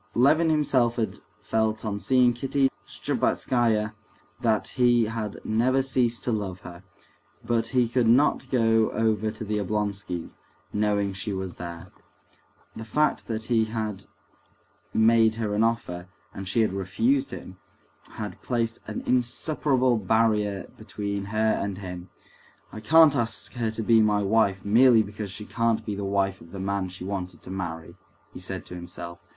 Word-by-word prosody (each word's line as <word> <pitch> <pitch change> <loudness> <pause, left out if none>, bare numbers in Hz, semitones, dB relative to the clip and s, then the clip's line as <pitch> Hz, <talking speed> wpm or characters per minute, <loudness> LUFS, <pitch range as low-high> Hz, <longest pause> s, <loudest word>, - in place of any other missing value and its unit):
Levin 155 +7 +4
himself 130 -6 +2
had 110 -4 -2 0.2
felt 110 +1 -1
on 100 -1 -2
seeing 125 +1 +3
Kitty 135 +2 +1 0.2
Shtcherbatskaya 110 -4 0 0.5
that 115 -3 +1
he 120 -2 +3
had 110 -2 -4
never 130 +5 +2
ceased 120 -3 0
to 125 - -1
love 100 -4 -3
her; 85 0 -10 0.6
but 115 -1 +1
he 125 0 +2
could 120 0 +1
not 130 +2 +3
go 115 -3 +3
over 110 -1 +1
to 110 0 -6
the 105 0 -1
Oblonskys', 100 -3 -3 0.4
knowing 105 -1 +1
she 95 +2 -4
was 95 -2 -5
there. 85 +1 -8 0.8
The 110 - -6
fact 150 +8 0
that 110 -1 -3
he 115 -1 +2
had 110 -3 -4 0.9
made 110 0 +4
her 110 -2 -2
an 105 +2 +2
offer, 95 -6 -1 0.3
and 95 -1 -7
she 105 +5 +2
had 110 -3 +1
refused 115 +8 0
him, 95 0 -9 0.5
had 105 -1 -6
placed 115 -2 -1
an - - -5
insuperable 130 0 +1
barrier 105 -2 +1
between 100 -1 -4
her 110 +2 +1
and 100 -1 -3
him. 90 -2 -7 0.6
"I - - -6
can't 155 +5 +6
ask 115 -4 0
her 120 -3 -1
to 110 +1 -4
be 115 +1 +5
my 105 -1 +2
wife 100 -2 +2
merely 115 +2 +6
because 105 0 -6
she 105 +2 -7
can't 115 -1 0
be 105 - -3
the 100 0 -4
wife 95 -1 0
of 85 - -15
the 100 - -6
man 100 -1 -2
she 90 0 -8
wanted 90 -2 -5
to 95 - -9
marry," 85 -4 -5 0.4
he - - -8
said - - -5
to - - -10
himself. 85 0 -8
110 Hz, 160 wpm, -26 LUFS, 100-120 Hz, 0.9 s, can't